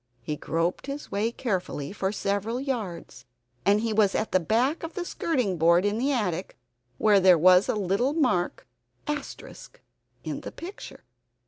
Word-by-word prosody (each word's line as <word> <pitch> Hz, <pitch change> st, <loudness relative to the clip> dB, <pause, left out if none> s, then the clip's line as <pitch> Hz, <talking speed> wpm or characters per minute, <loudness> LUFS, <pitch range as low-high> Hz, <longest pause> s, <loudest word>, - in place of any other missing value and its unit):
He 150 Hz, -, -3 dB
groped 165 Hz, -, -2 dB
his 280 Hz, +1 st, -6 dB
way 210 Hz, +3 st, 0 dB
carefully 190 Hz, -, -3 dB
for 195 Hz, -1 st, -1 dB
several 205 Hz, +3 st, -2 dB
yards; 205 Hz, -, -5 dB, 0.4 s
he 215 Hz, +2 st, +3 dB
was 205 Hz, -2 st, +3 dB
at 215 Hz, -, -1 dB
the 185 Hz, -, +4 dB
back 235 Hz, -, +1 dB
of 330 Hz, 0 st, -7 dB
the 360 Hz, -3 st, -3 dB
skirting 250 Hz, -, -1 dB
board 170 Hz, +3 st, +4 dB
in 205 Hz, +2 st, 0 dB
the 275 Hz, +4 st, +1 dB
attic, 195 Hz, -, -2 dB, 0.4 s
where 210 Hz, +3 st, +5 dB
there 185 Hz, -2 st, +6 dB
is 185 Hz, +1 st, +5 dB
a -, -, +1 dB
little 210 Hz, +7 st, 0 dB
mark 250 Hz, -, 0 dB, 0.2 s
* -, -, -40 dB
in 295 Hz, -1 st, -8 dB
the -, -, -7 dB
picture. 365 Hz, +4 st, -10 dB
205 Hz, 155 wpm, -26 LUFS, 185-255 Hz, 0.4 s, there